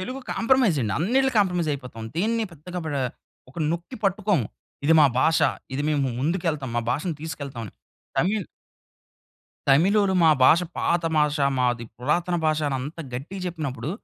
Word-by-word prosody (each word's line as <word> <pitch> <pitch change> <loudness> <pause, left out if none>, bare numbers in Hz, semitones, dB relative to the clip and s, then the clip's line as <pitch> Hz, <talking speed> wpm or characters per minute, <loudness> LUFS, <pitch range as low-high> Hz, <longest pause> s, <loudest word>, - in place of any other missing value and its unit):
Telugu 255 +8 -5
compromise 230 - +3
అండి. 105 -2 -1
అన్నిట్లికీ 255 +7 +2
compromise 180 -6 +1
అయిపోతాం. 125 -5 -7
దీన్ని 225 +4 +1
పెద్దగా 175 +3 -7
బ్రా 145 -3 -1 0.5
ఒక 140 - -23
నొక్కి 175 +9 -4
పట్టుకోము. 195 - +1 0.4
ఇది 165 - +5
మా 145 - +8
భాష 160 +2 +3 0.4
ఇది 145 - -1
మేము 150 -2 +1 0.2
ముందుకె‌ళ్తాము. 155 -5 -1
మా 120 - -1
భాషను 165 +2 -2
తీసుకెళ్తామని. 140 - -6 0.5
తమిళ్ 195 +1 +1 1.2
తమిళోలు 190 +7 +4
మా 160 - +7
భాష 165 +6 +6 0.2
పాత 170 0 +1
భాష. 150 0 +2 0.2
మాది 120 -2 0
పురాతన 170 +7 0
భాష 155 0 +2
అని 135 - -1
అంత 150 +5 -7 0.2
గట్టిగా 170 +10 -6
చెప్పినప్పుడు. 140 -6 -4
160 Hz, 145 wpm, -24 LUFS, 140-190 Hz, 1.2 s, మా